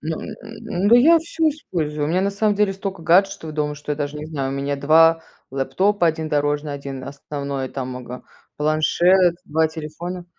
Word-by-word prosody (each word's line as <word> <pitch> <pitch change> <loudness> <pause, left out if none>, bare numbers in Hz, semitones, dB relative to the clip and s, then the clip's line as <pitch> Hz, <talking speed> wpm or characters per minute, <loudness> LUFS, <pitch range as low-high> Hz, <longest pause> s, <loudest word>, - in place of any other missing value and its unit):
Ну 160 +1 -3
м - - -7
м 225 0 -9
м, - - +4
да 235 - +7
я 325 +7 +6
всё 325 0 0
использую. 155 - -3
У - - -2
меня 180 +2 +2
на 200 +1 +1
самом 205 +1 +1
деле 205 -1 +2
стока 195 -2 -6
гаджетов 180 -2 +2
дома, 150 -1 -2
что 150 0 -5
я - - -3
даже 145 0 -3
не 150 +1 -6
знаю, 140 -4 -3
у - - -3
меня 140 +1 -2
два 165 +3 +5 0.3
лэптопа: 170 +9 +1
один 160 -1 -1
дорожный, 145 0 0
один 140 -2 -6
основной, 140 -1 -5
там, 130 -1 -5
ага, 125 0 -8 0.3
планшет, 170 +4 +3
два 160 +2 +1
телефона. 165 +3 -7
155 Hz, 195 wpm, -21 LUFS, 145-190 Hz, 0.3 s, да